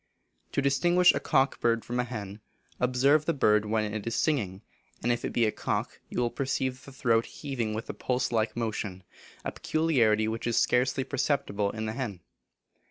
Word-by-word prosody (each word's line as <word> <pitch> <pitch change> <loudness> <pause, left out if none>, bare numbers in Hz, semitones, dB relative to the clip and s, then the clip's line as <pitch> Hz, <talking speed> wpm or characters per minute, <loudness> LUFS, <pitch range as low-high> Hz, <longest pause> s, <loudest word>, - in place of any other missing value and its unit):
To 140 - +1
distinguish 175 +7 +4
a - - -1
cock 135 -2 +2
bird 115 -1 +1
from 120 +1 -2
a - - +2
hen, 105 -4 -6 0.4
observe 135 +5 +3
the 165 - +1
bird 105 -5 +3
when 105 -1 0
it 110 0 -4
is 115 - -1
singing, 105 - 0 0.4
and 120 - +2
if 120 - -1
it - - -1
be 120 - +2
a 110 - +1
cock - - -3
you - - -3
will 120 -1 +1
perceive 130 -1 -2
the 140 - -11
throat 115 -4 +1
heaving 120 -7 -3
with 110 - -5
a - - -4
pulse 125 -1 -1
like 110 -1 0
motion, 105 -5 -3 0.4
a - - -1
peculiarity 120 -10 +2
which 115 +1 -3
is 120 - +1
scarcely 130 +2 +2
perceptible 135 -7 0
in 110 +1 -4
the 110 - -3
hen. 110 -8 -4
120 Hz, 190 wpm, -28 LUFS, 110-135 Hz, 0.4 s, distinguish